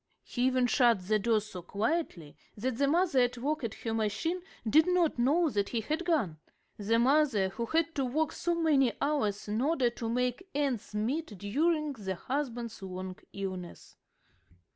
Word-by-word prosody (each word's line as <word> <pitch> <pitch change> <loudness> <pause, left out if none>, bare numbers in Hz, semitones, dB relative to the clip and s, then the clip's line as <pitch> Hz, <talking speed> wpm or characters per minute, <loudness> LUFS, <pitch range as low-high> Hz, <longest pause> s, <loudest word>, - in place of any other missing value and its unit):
He 245 0 0
even 255 -1 +2
shut 230 -5 +3
the 215 0 +3
door 220 0 +2
so 200 -4 -8
quietly 200 - -2 0.2
that 245 +3 -2
the 280 - +3
mother 335 -2 +3
at 245 0 +2
work 290 +4 -2
at 225 -3 -3
her 225 - -4
machine 225 - -1 0.3
did 315 +9 +5
not 355 -7 +2
know 305 +8 +3
that 205 -2 0
he 230 - -1
had 310 +9 -2
gone 225 - 0 0.4
the 215 +2 +1
mother 255 -6 +3
who 235 +4 -4
had 325 +2 +1
to 275 -4 0
work 310 +5 0
so 345 0 -1
many 290 -7 +3
hours 275 -10 0
in 215 +3 -1
order 270 -4 +2
to 230 -1 -5
make 250 +9 -1
ends 270 -8 -1
meet 235 +2 -2
during 300 - 0
the 195 -6 -4
husband's 240 -1 -4
long 185 -1 -6 0.2
illness. 185 -3 -6
245 Hz, 170 wpm, -30 LUFS, 210-305 Hz, 0.4 s, did